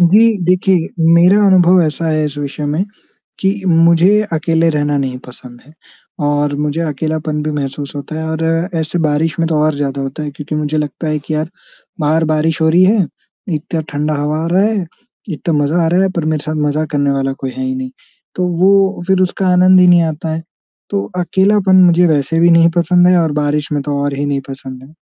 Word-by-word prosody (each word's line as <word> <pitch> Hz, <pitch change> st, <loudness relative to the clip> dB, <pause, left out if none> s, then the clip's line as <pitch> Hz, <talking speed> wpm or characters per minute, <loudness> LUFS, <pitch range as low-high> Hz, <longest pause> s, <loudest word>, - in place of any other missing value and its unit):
जी 200 Hz, +6 st, +5 dB, 0.2 s
देखिए 180 Hz, -1 st, +1 dB, 0.3 s
मेरा 180 Hz, +4 st, +5 dB
अनुभव 180 Hz, -1 st, +5 dB
ऐसा 160 Hz, +1 st, -2 dB
है 155 Hz, -1 st, 0 dB
इस 145 Hz, -1 st, -5 dB
विषय 145 Hz, +1 st, -5 dB
में 180 Hz, +6 st, -1 dB, 0.6 s
कि 190 Hz, -, +2 dB, 0.2 s
मुझे 170 Hz, +4 st, +4 dB
अकेले 165 Hz, +1 st, +1 dB
रहना 145 Hz, -1 st, -1 dB
नहीं 130 Hz, -2 st, -3 dB
पसंद 125 Hz, -1 st, -13 dB
है 150 Hz, -, -18 dB, 0.5 s
और 145 Hz, 0 st, 0 dB
मुझे 150 Hz, +2 st, -2 dB
अकेलापन 155 Hz, 0 st, -3 dB
भी 155 Hz, -, -2 dB
महसूस 140 Hz, -1 st, -5 dB
होता 145 Hz, +2 st, -7 dB
है, 160 Hz, -, -4 dB
और 160 Hz, 0 st, -3 dB, 0.4 s
ऐसे 160 Hz, +2 st, -3 dB
बारिश 155 Hz, +3 st, -1 dB
में 165 Hz, -, +1 dB
तो 160 Hz, -, 0 dB
और 155 Hz, -1 st, +1 dB
ज़्यादा 140 Hz, -1 st, -3 dB
होता 135 Hz, +3 st, -5 dB
है। 145 Hz, -, -4 dB
क्योंकि 150 Hz, +1 st, -7 dB
मुझे 150 Hz, 0 st, -2 dB
लगता 150 Hz, +2 st, -4 dB
है 155 Hz, 0 st, -1 dB
कि 155 Hz, +2 st, -5 dB
यार 155 Hz, +1 st, -3 dB, 0.5 s
बाहर 155 Hz, +2 st, +1 dB
बारिश 155 Hz, +1 st, 0 dB
हो 160 Hz, -, +3 dB
रही 175 Hz, +3 st, +4 dB
है, 200 Hz, -3 st, +3 dB, 0.5 s
इतना 160 Hz, +2 st, -3 dB
ठंडा 150 Hz, +1 st, -1 dB
हवा 150 Hz, +1 st, -2 dB
आ -, -, -2 dB
रहा 190 Hz, +2 st, +3 dB
है, 210 Hz, -5 st, -1 dB, 0.4 s
इतना 165 Hz, -1 st, -3 dB
मज़ा 165 Hz, +4 st, 0 dB
आ -, -, +1 dB
रहा 180 Hz, +3 st, +2 dB
है, 195 Hz, -, +2 dB
पर 170 Hz, -4 st, -3 dB
मेरे 155 Hz, -2 st, -1 dB
साथ 155 Hz, -, -3 dB
मज़ा 155 Hz, +2 st, -1 dB
करने 145 Hz, -1 st, +1 dB
वाला 135 Hz, 0 st, -1 dB
कोई 135 Hz, -1 st, -6 dB
है 260 Hz, -, -5 dB
ही 260 Hz, 0 st, -2 dB
नहीं। 260 Hz, 0 st, -5 dB, 0.5 s
तो 180 Hz, -1 st, 0 dB, 0.2 s
वो 195 Hz, -1 st, +3 dB
फ़िर 190 Hz, -1 st, +2 dB
उसका 185 Hz, +1 st, -1 dB
आनंद 185 Hz, +1 st, +5 dB
ही 180 Hz, -, +5 dB
नहीं 175 Hz, -1 st, +5 dB
आता 160 Hz, 0 st, -3 dB
है। 165 Hz, -, -5 dB, 0.5 s
तो 100 Hz, 0 st, -1 dB, 0.2 s
अकेलापन 190 Hz, +1 st, +3 dB
मुझे 175 Hz, 0 st, +4 dB
वैसे 155 Hz, +1 st, 0 dB
भी 170 Hz, +1 st, +5 dB
नहीं 165 Hz, 0 st, +5 dB
पसंद 180 Hz, +1 st, +3 dB
है 180 Hz, -, +4 dB
और 160 Hz, -2 st, -1 dB
बारिश 150 Hz, +1 st, -2 dB
में 145 Hz, -1 st, -1 dB
तो 145 Hz, 0 st, -3 dB
और 145 Hz, 0 st, -2 dB
ही 140 Hz, +1 st, -3 dB
नहीं 140 Hz, -1 st, -1 dB
पसंद 130 Hz, -1 st, -9 dB
है। 150 Hz, +4 st, -17 dB
160 Hz, 215 wpm, -15 LUFS, 145-175 Hz, 0.6 s, जी